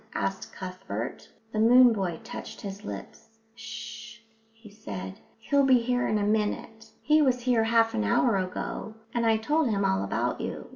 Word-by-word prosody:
asked 195 0 -2
Cuthbert. 180 - -6 0.2
The 215 - -2
moon 245 +2 +7
boy 185 -6 -2
touched - - -8
his 200 0 -7
lips. 105 - -9 0.2
"H'shh," 225 0 -8 0.3
he 225 -1 -16
said. 95 - -7 0.2
"He'll 280 +5 +2
be 260 -2 +6
here 245 +1 0
in 215 - +1
a 205 - 0
minute. 215 +1 -1
He 305 +1 +4
was 255 -3 +2
here 240 -2 +2
half 225 0 +3
an 105 - 0
hour 210 - +3
ago, 185 +3 -4 0.2
and 235 -1 +1
I 225 -1 +4
told 295 +5 +1
him 200 -2 +1
all 95 0 +1
about 100 - -1
you." - - -5
220 Hz, 175 wpm, -27 LUFS, 190-235 Hz, 0.3 s, moon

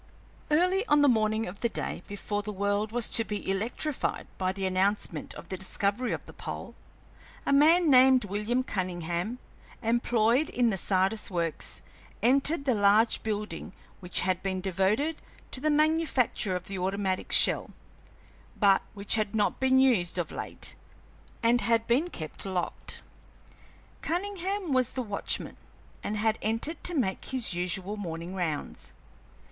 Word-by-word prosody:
Early 365 +6 +3
on 295 0 +4
the - - +6
morning 220 -2 +2
of 185 +3 -8
the 235 - +1
day - - -3
before 205 +1 -3
the 210 +1 -5
world 205 +2 -1
was 240 -1 +1
to 225 - +6
be 210 -2 -5
electrified 230 +9 -2
by 185 -1 +1
the 195 0 -4
announcement 185 -4 -1
of - - -11
the 190 - -4
discovery 200 +5 -1
of - - -4
the - - -12
pole, - - -7 0.7
a - - +2
man 320 +5 +5
named 255 -2 +6
William 210 +6 -1
Cunningham, 180 +1 -3 0.5
employed 235 +3 +2
in 245 -2 +2
the 195 - -2
Sardis 190 +3 +1
Works, 170 -4 -3 0.4
entered 275 +5 +3
the 260 - +3
large 210 +2 +3
building 210 -5 -4 0.3
which 180 -2 0
had 185 0 0
been 190 -1 -2
devoted 195 - 0 0.3
to - - -4
the 305 - +1
manufacture 300 - +1
of 180 0 -4
the 195 -1 -5
automatic 190 0 -2
shell, - - +4 0.9
but 200 -2 +4
which 200 0 0
had 215 -1 0
not 210 -2 +1
been 260 0 +3
used 235 -11 +3
of 175 -3 -2
late - - -3 0.7
and 240 +1 +4
had 230 -1 +2
been 270 +10 +2
kept 155 - -8
locked. 185 -3 -2 1.0
Cunningham 380 -1 -2
was 255 -1 +2
the 255 - -2
watchman, 205 -3 -1 0.5
and 210 +1 -2
had 220 +1 +1
entered 225 +9 -2
to 355 - +1
make 210 -10 -1
his 255 -7 -1
usual 180 +3 -2
morning 170 -2 -5
rounds. 170 -6 -4
215 Hz, 150 wpm, -28 LUFS, 190-255 Hz, 1.0 s, the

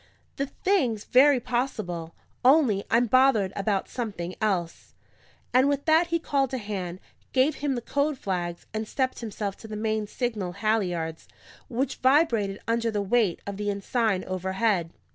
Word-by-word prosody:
"The 275 - -1
thing's 265 - 0
very 270 +1 +5
possible. 215 -10 -3 0.3
Only, 255 -7 +4
I'm 235 +2 +4
bothered 240 -5 +4
about 200 -1 0
something 200 -7 -4
else." 185 -6 -2 0.6
And 260 +3 +5
with 285 0 -1
that 320 +2 +4
he 335 0 +1
called 280 -5 0
a - - -1
hand, 190 -5 -5 0.3
gave 265 +4 +3
him 285 -2 -1
the 240 - -4
code 285 +2 0
flags, 175 -6 -3
and 215 0 -3
stepped 260 +1 -1
himself 210 -3 -4
to 220 - -11
the 215 - -6
main 215 0 -1
signal 210 -6 -3
halliards, 180 -6 -1 0.4
which 260 +3 -2
vibrated 245 -8 +2
under 230 0 +1
the 210 -2 -1
weight 205 -3 +1
of 200 -1 -5
the 205 0 -2
ensign 200 0 0
overhead. 190 -1 0
220 Hz, 155 wpm, -26 LUFS, 195-260 Hz, 0.6 s, very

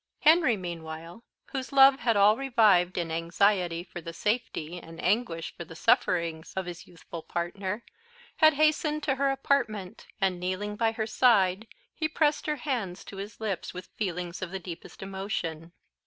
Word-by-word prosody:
Henry, 310 -7 +5
meanwhile, 165 +2 -7 0.3
whose 260 -3 -4
love 270 0 +7
had 230 -3 +2
all 205 +2 +6
revived 215 -9 +3
in 170 -2 -2
anxiety 170 +1 +1
for 175 -1 -9
the 165 +1 -7
safety, 180 -5 -2
and 165 -1 -12
anguish 205 -8 0
for 170 - -6
the 165 - -12
sufferings 165 -1 +1
of 190 -1 -2
his 175 -1 -8
youthful 170 -1 -9
partner, 190 +6 -3 0.5
had 315 -2 +6
hastened 305 0 +2
to 285 -2 +2
her 275 +1 +1
apartment, 240 -8 -1
and, 190 -3 +1
kneeling 185 +3 -3
by 225 +1 +2
her 220 -1 -2
side, 215 -3 +3 0.3
he 315 - -1
pressed 300 -1 +1
her 300 - +1
hands 240 -11 -3
to 195 - -9
his 200 +2 -7
lips 200 -5 -3
with 180 - -8
feelings 180 -3 -3
of 185 - -3
the 190 - -4
deepest 175 0 -9
emotion. 190 -4 -4
195 Hz, 165 wpm, -28 LUFS, 175-240 Hz, 0.5 s, love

